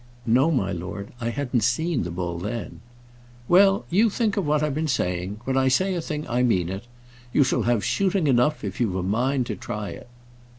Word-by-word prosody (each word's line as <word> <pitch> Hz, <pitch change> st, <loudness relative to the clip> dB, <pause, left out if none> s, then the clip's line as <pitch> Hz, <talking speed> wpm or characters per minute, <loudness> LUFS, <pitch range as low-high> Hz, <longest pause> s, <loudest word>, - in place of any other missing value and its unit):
"No, 130 Hz, +6 st, +4 dB
my 125 Hz, -11 st, 0 dB
lord. 95 Hz, +4 st, -6 dB
I 115 Hz, -, -1 dB
hadn't 125 Hz, -1 st, -1 dB
seen 135 Hz, +7 st, +1 dB
the 90 Hz, -, -3 dB
bull 85 Hz, 0 st, -3 dB
then." 105 Hz, +5 st, -5 dB, 0.7 s
"Well; 195 Hz, +3 st, +5 dB
you 215 Hz, +6 st, +4 dB
think 215 Hz, -1 st, 0 dB
of 195 Hz, -7 st, -1 dB
what 150 Hz, 0 st, +2 dB
I've 150 Hz, -2 st, 0 dB
been 155 Hz, +2 st, -1 dB
saying. 95 Hz, -5 st, -1 dB
When 130 Hz, +1 st, -1 dB
I 130 Hz, 0 st, +3 dB
say 185 Hz, +9 st, +2 dB
a 175 Hz, -, -2 dB
thing, 150 Hz, -1 st, -4 dB
I 120 Hz, +1 st, 0 dB
mean 95 Hz, -9 st, +2 dB
it. 95 Hz, +4 st, -5 dB, 0.5 s
You 140 Hz, -, +4 dB
shall 130 Hz, -, +1 dB
have 115 Hz, -5 st, +1 dB
shooting 195 Hz, -3 st, +1 dB
enough, 135 Hz, +2 st, +2 dB
if 100 Hz, +2 st, -4 dB
you 120 Hz, -, +3 dB
have 95 Hz, -, -4 dB
a 95 Hz, -, -1 dB
mind 125 Hz, +7 st, 0 dB
to -, -, -4 dB
try 105 Hz, -2 st, -5 dB
it." 85 Hz, -, -10 dB
125 Hz, 215 wpm, -24 LUFS, 100-155 Hz, 0.7 s, Well